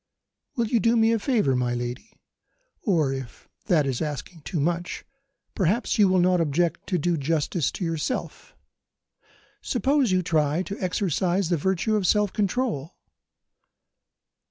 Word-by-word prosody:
"Will 235 - +1
you 230 +1 +1
do 230 +2 +3
me 225 0 +4
a 230 - +1
favour, 205 - +1
my 125 -1 0
lady? 125 - -6 0.6
Or, 160 -9 +1
if 135 -3 -8 0.2
that 160 -6 +3
is 130 -3 -2
asking 155 +2 -5
too 160 +2 -3
much, 170 +4 -2 0.5
perhaps 205 +5 0
you 205 - +7
will 185 0 +3
not 180 0 +3
object 165 +2 0
to 185 - 0
do 170 +1 0
justice 155 +2 0
to 185 - -3
yourself. 165 - -4 1.1
Suppose 265 -1 +1
you 185 0 +2
try 155 +1 +1
to 200 +2 -6
exercise 185 -1 0
the 175 - +2
virtue 190 +6 0
of 200 -4 +1
self 210 0 +2
control? 205 - -1
175 Hz, 145 wpm, -25 LUFS, 150-210 Hz, 1.1 s, you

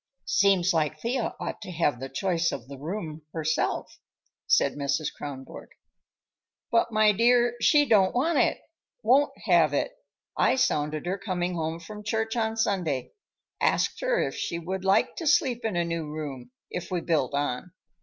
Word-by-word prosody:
"Seems 185 0 +3
like 155 -3 0
Thea 235 0 -2
ought - - -5
to - - -8
have 150 -7 0
the 135 +1 -6
choice 170 +4 0
of 115 - -6
the 140 -1 -9
room, 160 -1 -5
herself," 160 -1 -1 0.5
said - - +3
Mrs. 140 +1 -1
Kronborg. 135 -2 -8 1.0
"But, 230 0 +2
my 215 -1 +5
dear, 240 +3 +3
she 295 +4 +5
don't 200 -6 +4
want 295 +4 +2
it. - - +2 0.4
Won't 280 +3 +4
have - - +4
it. - - 0 0.4
I - - +3
sounded 155 - 0
her 190 +2 -2
coming 180 -2 -2
home 165 -1 -3
from 210 +5 -9
church 220 +1 -1
on 225 -1 -1
Sunday; 175 - -1 0.5
asked - - +1
her - - +1
if - - -1
she 170 - -3
would 185 +3 -4
like 195 +1 +2
to 330 - -3
sleep 260 -6 +2
in 220 -4 -1
a 175 0 +1
new 165 -2 -3
room, 140 -5 -6 0.2
if 180 - -5
we 180 -2 -1
built 150 -6 0
on. 145 +3 -2
180 Hz, 165 wpm, -27 LUFS, 155-220 Hz, 1.0 s, my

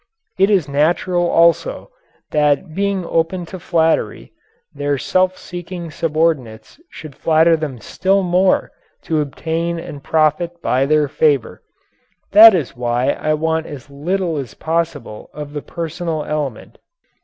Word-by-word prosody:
It 195 +1 +4
is 190 -8 +2
natural, 175 +5 +1
also, 170 -1 +2 0.4
that 150 +3 +1
being 195 0 -1
open 165 +2 -1
to 185 +2 -9
flattery, 165 -1 0 0.4
their 145 0 -1
self 185 +6 +1
seeking 175 -1 -8
subordinates 155 - -2
should 155 -3 -10
flatter 160 +3 +3
them 155 -5 -4
still 190 - 0
more 185 +1 +2 0.3
to 155 -2 0
obtain 165 +4 -3
and 145 -4 -9
profit 160 +2 0
by 135 -3 +1
their 150 0 +3
favor. 145 -3 0 0.7
That 215 0 +9
is 155 -8 -3
why 120 +2 0
I 155 0 -1
want 160 +1 -1
as 140 -1 -10
little 170 +3 -2
as 130 -5 -6
possible 160 -9 -3
of 150 -1 -7
the 145 - -4
personal 165 -1 -4
element. 145 -7 -5
160 Hz, 130 wpm, -18 LUFS, 145-175 Hz, 0.7 s, That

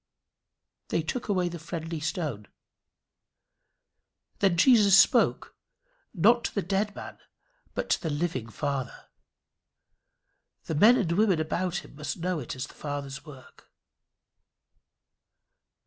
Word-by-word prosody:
They 165 - -1
took 240 +10 -4
away 185 -3 +1
the 170 -1 -6
friendly 165 0 -5
stone. 150 - -4 1.9
Then 190 -4 +2
Jesus 205 -1 +6
spoke, - - +3 0.6
not 230 +6 +3
to - - -4
the 200 - 0
dead 200 +3 -1
man, - - -9 0.6
but - - -2
to - - +2
the 165 - -2
living 145 -6 -2
Father. 140 +1 -4 1.5
The - - -4
men 215 +11 +6
and 190 -9 0
women 190 -1 +2
about 175 +3 -2
him - - -15
must 150 +1 -5
know 180 -1 -2
it 130 - -6
as 130 - -4
the - - -15
Father's 145 -1 -6
work. 135 -3 -15
170 Hz, 120 wpm, -27 LUFS, 150-195 Hz, 1.9 s, Jesus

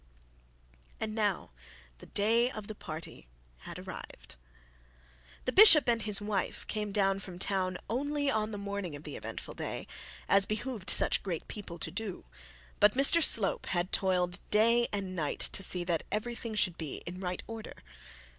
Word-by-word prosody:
And 215 -1 -3
now 205 - -1 0.5
the - - -13
day 230 +4 +2
of 215 -5 -8
the 215 - -7
party 155 - -8 0.3
had - - -10
arrived. - - -10 1.1
The - - 0
bishop 330 -6 +9
and 230 -1 +2
his 210 -2 +3
wife 205 -2 -3
came 210 -2 -4
down 195 -1 +1
from 185 -3 -9
town, 185 -1 -1
only 285 +5 -2
on 215 -5 0
the 210 - -6
morning 200 -5 -5
of 145 - -11
the 150 - -8
eventful - - -7
day, - - -6 0.4
as 195 0 +4
behoved 215 -2 -4
such - - +4
great 175 -5 -5
people 190 -5 -8
to - - -2
do; 205 -1 -5 0.5
but 210 0 +5
Mr 280 +5 +7
Slope 220 -10 +3
had 175 0 -2
toiled 180 -2 0
day 230 +3 +3
and 195 -2 -4
night 155 -4 -3
to - - +4
see 180 -1 +4
that 170 -2 -1
everything 230 +1 -4
should 185 -5 +1
be 155 -4 -6
in 180 +2 -7
right 180 -1 -4
order. 225 -1 -9
205 Hz, 165 wpm, -30 LUFS, 185-225 Hz, 1.1 s, bishop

